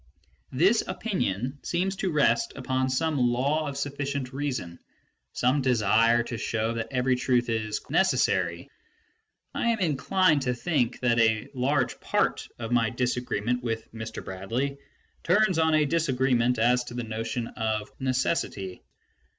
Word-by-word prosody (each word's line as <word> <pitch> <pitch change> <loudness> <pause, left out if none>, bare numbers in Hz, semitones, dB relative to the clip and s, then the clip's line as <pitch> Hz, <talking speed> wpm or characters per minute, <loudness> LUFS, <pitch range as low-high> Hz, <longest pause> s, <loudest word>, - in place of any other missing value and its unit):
This 190 - +4
opinion 140 - -2
seems 185 +3 -1
to 190 -2 -1
rest 140 -6 +2
upon 130 -1 -1
some 150 +3 0
law 130 +6 +1
of 140 -1 -5
sufficient 140 -2 -3
reason, 130 -12 -4 0.5
some 130 +3 +1
desire 115 -1 +3
to 115 -1 -5
show 115 +1 -1
that 115 0 -3
every 130 -1 +1
truth 125 -1 +1
is 110 -2 -1
" - - -25
necessary - - +1 0.4
". - - -48
I - - -1
am 230 -1 +2
in 160 -7 +1
clined 185 -3 +3
to 125 -1 -1
think 130 -4 -1
that 120 -2 +2
a 110 +2 +2
large 130 +1 0
part - - 0
of 115 0 -5
my 115 -2 +3
disagreement 125 -1 -1
with 115 -2 -4
Mr. 110 -1 -7
Bradley 120 +9 -3 0.4
turns 185 -1 +3
on 160 -1 +3
a 155 -1 +4
disagreement 130 -6 +1
as 125 +2 +3
to 120 - -8
the 120 - -3
notion 115 +1 -3
of 110 -2 -3
" - - -36
necessity 130 - -1
125 Hz, 150 wpm, -27 LUFS, 115-145 Hz, 0.5 s, This